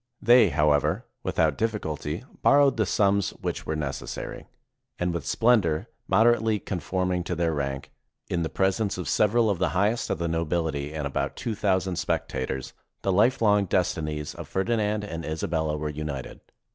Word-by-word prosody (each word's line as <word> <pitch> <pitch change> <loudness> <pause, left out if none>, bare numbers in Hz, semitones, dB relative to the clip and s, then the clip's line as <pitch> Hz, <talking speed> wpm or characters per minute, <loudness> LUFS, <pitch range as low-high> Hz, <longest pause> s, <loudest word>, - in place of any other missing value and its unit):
They, 120 -4 +6
however, 75 -1 +2 0.2
without - - +1
difficulty, 85 -7 -2 0.2
borrowed 140 -2 +5
the 110 -3 +1
sums 100 -1 +2
which - - -4
were 80 - -1
necessary; 70 -5 -5 0.5
and 90 0 -1
with 80 -4 -4
splendor 105 -4 +2 0.2
moderately 110 +1 +3
conform 90 -1 -2
ing 90 -1 0
to 90 - -2
their 85 -1 0
rank, 70 -2 -3 0.4
in 85 - -1
the 80 - -1
presence 95 +2 0
of 90 -5 -4
several 110 +7 +3
of 100 -5 0
the 90 - +2
highest 105 +5 +1
of - - 0
the 85 +1 -2
nobility 80 -3 -1
and 75 -2 -4
about 70 - -2
two 115 - -3
thousand 95 -3 0
spectators, 65 -7 -2 0.3
the 95 - +1
life 120 +6 +3
long 105 -2 +4
destinies 75 -5 -1
of - - -8
Ferdinand 105 +1 0
and 85 -5 -5
Isabella 80 -1 -1
were 75 0 -3
united. 75 -3 -5
90 Hz, 160 wpm, -26 LUFS, 75-105 Hz, 0.5 s, They